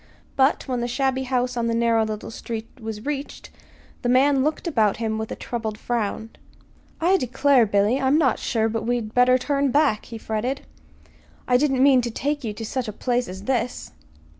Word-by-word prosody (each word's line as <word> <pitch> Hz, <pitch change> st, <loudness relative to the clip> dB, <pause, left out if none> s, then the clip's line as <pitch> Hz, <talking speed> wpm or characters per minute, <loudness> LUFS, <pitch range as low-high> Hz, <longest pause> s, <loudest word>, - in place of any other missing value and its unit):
But 275 Hz, +3 st, +2 dB
when 250 Hz, -2 st, -1 dB
the 240 Hz, -, -1 dB
shabby 265 Hz, +1 st, 0 dB
house 250 Hz, -1 st, -1 dB
on 235 Hz, -1 st, -1 dB
the 230 Hz, -, 0 dB
narrow 230 Hz, -1 st, +3 dB
little 215 Hz, 0 st, -5 dB
street 225 Hz, -1 st, -6 dB
was 220 Hz, -1 st, -6 dB
reached, 290 Hz, -1 st, -5 dB, 0.5 s
the 245 Hz, -, -1 dB
man 265 Hz, +2 st, +4 dB
looked 305 Hz, +4 st, -1 dB
about 220 Hz, -10 st, +2 dB
him 220 Hz, -1 st, -2 dB
with 220 Hz, -, -5 dB
a -, -, -3 dB
troubled 220 Hz, -3 st, -4 dB
frown. 225 Hz, -1 st, -3 dB, 0.7 s
"I 360 Hz, +4 st, +3 dB
declare, 260 Hz, -, +3 dB
Billy, 205 Hz, +6 st, +2 dB
I'm 265 Hz, +3 st, +3 dB
not 270 Hz, -7 st, +2 dB
sure 225 Hz, -1 st, 0 dB
but 225 Hz, 0 st, -2 dB
we'd 230 Hz, -2 st, -2 dB
better 250 Hz, +1 st, +5 dB
turn 280 Hz, +1 st, 0 dB
back," 280 Hz, -6 st, +2 dB
he 230 Hz, -, -8 dB
fretted. 225 Hz, +5 st, -3 dB, 0.9 s
"I 250 Hz, -, +3 dB
didn't 265 Hz, -1 st, +3 dB
mean 270 Hz, -2 st, +6 dB
to 240 Hz, -, -3 dB
take 285 Hz, +5 st, -2 dB
you 220 Hz, -, -2 dB
to 225 Hz, +2 st, -7 dB
such 255 Hz, +2 st, -3 dB
a -, -, -3 dB
place 245 Hz, +2 st, -1 dB
as 190 Hz, +2 st, -8 dB
this." 250 Hz, 0 st, -2 dB
245 Hz, 190 wpm, -23 LUFS, 225-270 Hz, 0.9 s, mean